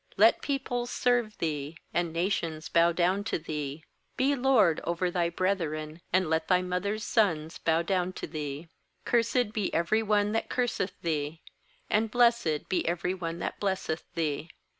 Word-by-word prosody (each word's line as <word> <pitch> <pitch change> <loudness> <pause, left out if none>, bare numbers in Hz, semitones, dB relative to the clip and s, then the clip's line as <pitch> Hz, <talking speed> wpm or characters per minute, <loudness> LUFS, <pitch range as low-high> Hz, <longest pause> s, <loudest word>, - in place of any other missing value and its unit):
29Let - - +6
peoples 245 -4 -2
serve 245 -5 +1
thee, 150 -1 -3 0.2
And 175 -1 0
nations 165 -2 -1
bow 170 0 +4
down 180 +4 +1
to 225 - 0
thee. 150 -2 -5 0.3
Be 270 +2 +3
lord 245 - +4
over 175 +1 -1
thy 175 -1 +1
brethren, 165 -4 -2
And 185 -1 +3
let 160 0 0
thyvmother's 185 +4 0
sons 165 -8 +1
bow 165 +1 +2
down 185 0 0
to - - -5
thee. 150 0 -5 0.4
Cursed 235 -1 +2
be 210 -4 -1
every 170 +7 +2
one 210 -1 +2
that 225 - -1
curseth 230 -6 -1
thee, 155 -1 -2 0.4
And 220 +1 +1
blessed 235 -10 +2
be 185 - +1
every 175 +2 0
one 170 -3 -4
that 175 - -4
blesseth 190 -5 -2
thee. 160 -1 -1
180 Hz, 155 wpm, -29 LUFS, 160-210 Hz, 0.4 s, 29Let